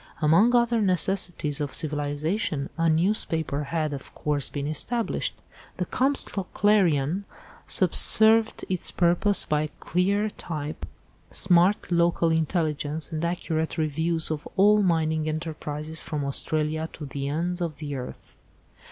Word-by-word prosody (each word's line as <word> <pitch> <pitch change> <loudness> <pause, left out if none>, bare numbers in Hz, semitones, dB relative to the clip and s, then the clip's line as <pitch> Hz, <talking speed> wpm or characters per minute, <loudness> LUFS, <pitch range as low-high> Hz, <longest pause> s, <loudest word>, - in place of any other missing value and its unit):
Among 170 +10 +4
other 235 -1 +2
necessities 180 -6 0
of 145 -3 -3
civilisation, 150 +1 -2
a 165 0 +1
newspaper 160 -4 0
had, 155 0 -2
of 135 - -9
course, 145 -2 0
been 140 -1 -4
established. 220 +10 -2 0.3
The - - -1
Comstock 260 -8 -2
Clarion 185 -4 +2 0.4
subserved 220 0 +4
its 185 -2 0
purpose 175 +3 +2
by 150 0 0
clean 200 +4 0
type, 155 -2 -5 0.4
smart 180 +1 +3
local 170 -1 +2
intelligence, 160 -2 -1
and 160 0 -3
accurate 165 -2 -2
reviews 160 +1 0
of 150 -1 -4
all 210 +2 +5
mining 160 -4 +1
enterprises 155 -1 -5
from 150 -2 -4
Australia 155 +3 -1
to 150 - -8
the 140 0 -5
ends 175 +4 -2
of 165 -3 -2
the 145 -2 -5
earth. 125 -1 -9
160 Hz, 125 wpm, -25 LUFS, 150-185 Hz, 0.4 s, all